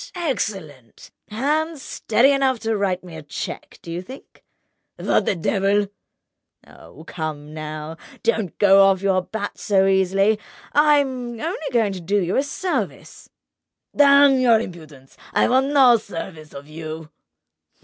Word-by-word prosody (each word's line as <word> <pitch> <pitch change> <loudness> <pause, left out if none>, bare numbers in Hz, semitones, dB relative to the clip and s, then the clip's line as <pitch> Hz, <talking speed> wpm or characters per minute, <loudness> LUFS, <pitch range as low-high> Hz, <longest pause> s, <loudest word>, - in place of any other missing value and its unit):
Excellent! 190 - -5 0.2
Hand 300 +8 -1
steady 255 +1 +1
enough 270 -2 +2
to 225 0 -1
write 190 -3 -1
me 175 -3 -11
a 160 - -8
cheque, 145 -1 -7
do 170 - -8
you 170 +1 -4
think?" 260 +9 -14 0.5
"What - - 0
the - - +1
devil!" 195 +3 0 0.8
"Oh, 135 - -15
come 155 -3 -6
now! 155 +1 -7 0.3
Don't 220 -6 -1
go 195 -1 +6
off 190 0 +1
your 190 -1 +2
bat 205 +3 -6
so 195 -2 +2
easily. 195 +2 +2 0.3
I'm 270 -5 +2
only 345 - -4
going 225 -5 +1
to 185 - -7
do 200 +5 0
you 180 -1 -1
a - - +3
service—" 350 +6 -4 0.7
"Damn 280 -1 +6
your 235 -3 +4
impudence! 155 - -10 0.2
I - - +3
want 260 +2 +2
no 265 -4 +5
services 165 -6 -9
of 140 +1 -10
you!" 155 0 -8
200 Hz, 140 wpm, -21 LUFS, 165-255 Hz, 0.8 s, go